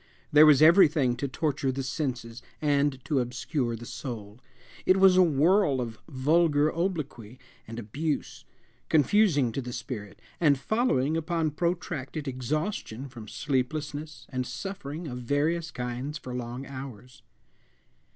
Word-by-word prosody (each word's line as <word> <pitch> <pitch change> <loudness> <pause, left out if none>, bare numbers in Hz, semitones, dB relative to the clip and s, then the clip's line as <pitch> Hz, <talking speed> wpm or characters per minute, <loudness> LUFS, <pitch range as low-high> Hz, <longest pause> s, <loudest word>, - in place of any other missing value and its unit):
There 150 +1 +8
was 150 0 +7
everything 155 -7 +6
to 140 - -2
torture 145 -1 -1
the 135 +1 -3
senses 125 -4 -4 0.2
and 145 -2 +2
to 145 -5 +1
obscure 125 +1 -2
the 115 +1 -9
soul. 110 -2 -7 0.4
It 185 - +4
was 190 -1 +6
a 185 - +7
whirl 160 -1 +3
of 115 -3 -4
vulgar 150 +2 +2
obloquy 150 - -3 0.3
and 115 +1 -7
abuse, 140 +8 -3 0.5
confusing 150 - +3
to 135 - -3
the 125 -1 -6
spirit, 115 -4 -6 0.2
and 145 -5 +4
following 155 - +1
upon 165 -1 -1
protracted 155 -3 -3
exhaustion 135 - -3
from 115 -4 -10
sleeplessness 150 +2 -3
and 130 -2 -3
suffering 160 +2 -6
of 125 -2 -5
various 150 +7 0
kinds 125 +4 -4
for 130 -4 -8
long 125 +2 -5
hours. 130 -3 -9
140 Hz, 130 wpm, -28 LUFS, 125-155 Hz, 0.5 s, There